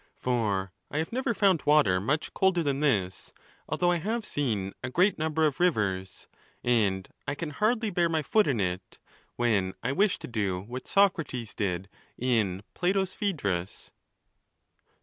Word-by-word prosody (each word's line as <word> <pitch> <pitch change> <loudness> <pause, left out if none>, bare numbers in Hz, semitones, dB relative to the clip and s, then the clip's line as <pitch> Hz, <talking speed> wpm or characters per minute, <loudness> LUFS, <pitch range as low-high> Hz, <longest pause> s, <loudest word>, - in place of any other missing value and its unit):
For 105 -7 -1 0.2
I - - -4
have 160 +1 -1
never 255 -2 0
found 195 -6 +3
water 145 -12 +4
much 150 +9 -1
colder 190 -3 +2
than 140 -2 0
this, 95 - 0 0.4
although 175 +3 +2
I 175 - +2
have 220 +5 -2
seen 105 - -2
a 130 - -2
great 180 +8 +2
number 160 0 +1
of 145 -3 0
rivers; 100 - 0 0.4
and 100 -6 +1 0.2
I 145 - -1
can 155 +1 -5
hardly 220 +5 +1
bear 175 -2 +2
my 160 -2 0
foot 215 +8 +3
in 130 -6 +1
it, 90 -1 -3 0.4
when 100 -6 +1
I 125 - 0
wish 195 +6 +2
to - - -8
do 100 -6 -1
what 125 +6 -8
Socrates 165 - +1
did 95 -2 -2 0.3
in 110 -7 0
Plato's 190 +1 0
Phedrus. 100 - -2
135 Hz, 155 wpm, -28 LUFS, -, 0.4 s, water